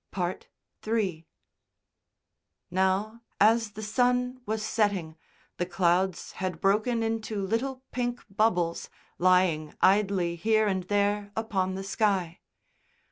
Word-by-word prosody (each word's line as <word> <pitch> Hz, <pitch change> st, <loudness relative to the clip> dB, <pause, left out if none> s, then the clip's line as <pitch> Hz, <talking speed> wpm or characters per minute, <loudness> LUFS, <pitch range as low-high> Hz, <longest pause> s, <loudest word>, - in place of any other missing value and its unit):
III 195 Hz, -8 st, -1 dB, 1.4 s
Now, 190 Hz, +5 st, 0 dB, 0.2 s
as 220 Hz, 0 st, +4 dB
the 215 Hz, +1 st, -7 dB
sun 250 Hz, +3 st, +1 dB
was 215 Hz, 0 st, -2 dB
setting, 200 Hz, -9 st, 0 dB, 0.4 s
the 175 Hz, -, -1 dB
clouds 180 Hz, 0 st, +1 dB
had 185 Hz, -3 st, -4 dB
broken 215 Hz, +5 st, +2 dB
into 220 Hz, -3 st, -2 dB
little 255 Hz, +6 st, -2 dB
pink 245 Hz, -1 st, -2 dB
bubbles, 185 Hz, -5 st, 0 dB, 0.3 s
lying 180 Hz, -4 st, +3 dB
idly 190 Hz, -3 st, +3 dB
here 220 Hz, +4 st, +2 dB
and 190 Hz, -3 st, -1 dB
there 205 Hz, +1 st, 0 dB
upon 190 Hz, -4 st, -1 dB
the 195 Hz, -, -5 dB
sky. 195 Hz, -4 st, 0 dB
200 Hz, 105 wpm, -28 LUFS, 185-220 Hz, 1.4 s, as